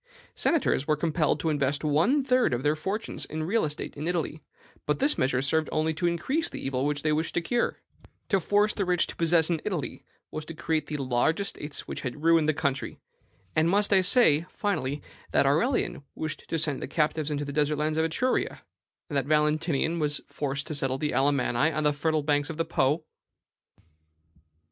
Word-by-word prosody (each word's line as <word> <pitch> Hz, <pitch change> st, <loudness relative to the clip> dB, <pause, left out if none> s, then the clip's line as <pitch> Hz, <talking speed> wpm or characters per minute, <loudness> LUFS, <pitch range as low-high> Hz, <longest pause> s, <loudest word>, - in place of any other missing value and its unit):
Senators 280 Hz, -, +1 dB
were 155 Hz, -, +3 dB
compelled 155 Hz, -1 st, +1 dB
to 160 Hz, -, +1 dB
invest 145 Hz, 0 st, 0 dB
one 165 Hz, -, +3 dB
third 255 Hz, -, +2 dB
of 120 Hz, -, -4 dB
their 150 Hz, +1 st, +2 dB
fortunes 195 Hz, +8 st, -3 dB
in 155 Hz, +1 st, -4 dB
real 210 Hz, +8 st, +1 dB
estate 150 Hz, +1 st, -3 dB
in 150 Hz, +2 st, -4 dB
Italy; 165 Hz, -3 st, -2 dB, 0.5 s
but 150 Hz, -, +1 dB
this 285 Hz, +3 st, +2 dB
measure 130 Hz, 0 st, +1 dB
served 155 Hz, +3 st, +1 dB
only 155 Hz, +1 st, +1 dB
to 175 Hz, +3 st, 0 dB
increase 265 Hz, -, 0 dB
the -, -, -7 dB
evil 135 Hz, +1 st, -1 dB
which 145 Hz, -1 st, -2 dB
they 155 Hz, -1 st, +2 dB
wished 160 Hz, +2 st, -1 dB
to -, -, +3 dB
cure. 235 Hz, +8 st, 0 dB, 0.5 s
To 195 Hz, -, +3 dB
force 205 Hz, +4 st, +2 dB
the 200 Hz, -, -1 dB
rich 180 Hz, -2 st, +2 dB
to -, -, -9 dB
possess 165 Hz, 0 st, +3 dB
in 160 Hz, -2 st, 0 dB
Italy 180 Hz, -9 st, -4 dB, 0.3 s
was 155 Hz, -, -4 dB
to 165 Hz, -, -7 dB
increase 155 Hz, -1 st, -1 dB
the 150 Hz, -, -3 dB
large 130 Hz, +4 st, +1 dB
estates 150 Hz, -7 st, -4 dB
which -, -, -5 dB
had 140 Hz, +3 st, -5 dB
ruined 165 Hz, -2 st, +4 dB
the -, -, +3 dB
country. 140 Hz, -3 st, -2 dB, 0.6 s
And 160 Hz, +2 st, +3 dB
must 205 Hz, +2 st, +2 dB
I 190 Hz, -, +6 dB
say, 170 Hz, -, +4 dB
finally, 150 Hz, -9 st, -2 dB, 0.3 s
that -, -, +4 dB
Aurelian 160 Hz, -, +1 dB
wished 155 Hz, -1 st, -5 dB
to 165 Hz, -, 0 dB
send 150 Hz, -4 st, 0 dB
the -, -, -4 dB
captives 155 Hz, +1 st, 0 dB
into 145 Hz, -1 st, -2 dB
the 140 Hz, -, -6 dB
desert 150 Hz, +1 st, +1 dB
lands 155 Hz, +1 st, 0 dB
of -, -, +3 dB
Etruria, 205 Hz, +11 st, 0 dB, 0.5 s
and 150 Hz, -, -6 dB
that 140 Hz, -1 st, 0 dB
Valentinian 155 Hz, +1 st, +1 dB
was 150 Hz, -1 st, 0 dB
forced 140 Hz, -1 st, -3 dB
to -, -, -5 dB
settle 135 Hz, -2 st, 0 dB
the 150 Hz, +2 st, -1 dB
Alamanni 135 Hz, +2 st, +2 dB
on 155 Hz, -, -1 dB
the 150 Hz, 0 st, +3 dB
fertile 155 Hz, +1 st, 0 dB
banks 145 Hz, 0 st, +1 dB
of 165 Hz, -, -5 dB
the 165 Hz, -, 0 dB
Po?" 155 Hz, -1 st, +1 dB
155 Hz, 200 wpm, -27 LUFS, 145-170 Hz, 0.6 s, I